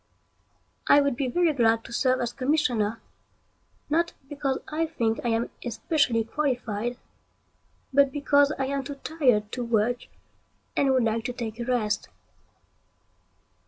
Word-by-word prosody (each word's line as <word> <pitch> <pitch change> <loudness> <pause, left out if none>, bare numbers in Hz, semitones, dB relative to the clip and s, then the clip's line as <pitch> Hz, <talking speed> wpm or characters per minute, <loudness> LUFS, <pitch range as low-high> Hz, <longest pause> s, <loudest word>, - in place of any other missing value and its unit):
I 285 - +7
would 280 -3 +1
be 260 +1 -1
very 335 +4 +2
glad 225 -3 +3
to - - -10
serve 255 +1 +2
as 240 0 -2
commissioner, 250 -6 0 0.9
not 335 +3 +1 0.2
because 280 -2 -1
I 320 +2 -1
think 230 -8 -1
I - - -1
am 230 +1 0
especially 240 -1 +1
qualified, 240 -3 -2 1.0
but 280 0 +5
because 285 0 +3
I 270 - 0
am 275 0 -2
too 280 +2 -6
tired 255 -9 +1
to 250 - -3
work 235 +1 0 0.7
and 275 - +2
would 260 -2 +3
like 225 0 0
to 250 - -2
take 230 -2 -5
a 235 - -3
rest. 235 -4 0
255 Hz, 140 wpm, -26 LUFS, 230-285 Hz, 1.0 s, I